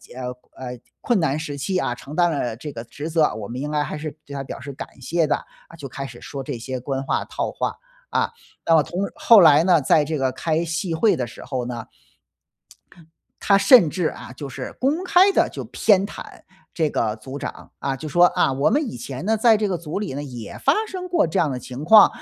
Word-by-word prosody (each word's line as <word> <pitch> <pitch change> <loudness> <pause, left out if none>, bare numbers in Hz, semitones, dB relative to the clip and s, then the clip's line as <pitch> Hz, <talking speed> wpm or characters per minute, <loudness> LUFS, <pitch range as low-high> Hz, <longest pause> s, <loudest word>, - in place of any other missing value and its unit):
呃， 125 -1 -4 0.2
呃， 125 -1 -7 0.2
困 240 - +1
难 150 -2 0
时 150 -2 -5
期， 185 +7 -1
啊， 120 -8 -1
承 140 +4 -11
担 175 -1 +4
了 140 -7 -2
这 145 +4 -7
个 115 - -6
职 145 +6 -7
责， 160 -2 +2
我 105 -2 -6
们 125 +4 -5
应 150 +1 -3
该 150 -1 +1
还 145 - -3
是 155 0 -5
对 140 - -10
他 140 -1 -4
表 - - -7
示 140 +3 -8
感 135 - -10
谢 165 +6 0
的。 150 - +1 0.3
啊， - - -13
就 145 -4 -7
开 135 +1 -6
始 120 -2 -10
说 140 - -6
这 135 -2 -5
些 130 +2 -5
官 135 +1 -3
话、 - - 0
套 - - -3
话。 - - -3 0.3
啊， - - 0 0.3
那 165 - +4
么 160 - +6
同 175 +7 -4
后 265 -9 +7
来 155 -1 +7
呢， 175 -4 +5
在 150 +2 +3
这 155 +1 -2
个 135 -2 0
开 160 +4 -1
戏 165 +1 -2
会 215 +6 +3
的 125 -2 -2
时 - - -11
候 130 -3 -3
呢 120 -2 -5 1.6
他 200 -1 +5
甚 210 - +7
至， 180 -1 -1
啊， 130 - -6
就 140 +2 -7
是 130 0 -6
公 290 +7 +1
开 370 +2 +5
地 - - +3
就 - - -6
偏 200 -2 +3
袒 - - -8 0.5
这 160 -3 +1
个 110 -5 -1
组 130 +5 -9
长， - - -7
啊， 135 -1 -2
就 155 +3 -7
说： 175 +4 +6
“啊， 135 - +3
我 140 +6 +2
们 290 +3 +1
以 - - -7
前 130 +5 -6
呢， 220 +1 +3
在 225 0 +5
这 210 0 0
个 190 -3 -1
组 165 +1 -5
里 200 -10 -4
呢 145 - -4
也 120 -7 -8
发 275 - +3
生 370 -3 -6
过 345 - +2
这 160 - 0
样 155 - +1
的 130 - -3
情 125 +3 -7
况。 210 +5 +8
150 Hz, 255 characters per minute, -22 LUFS, 130-180 Hz, 1.6 s, 况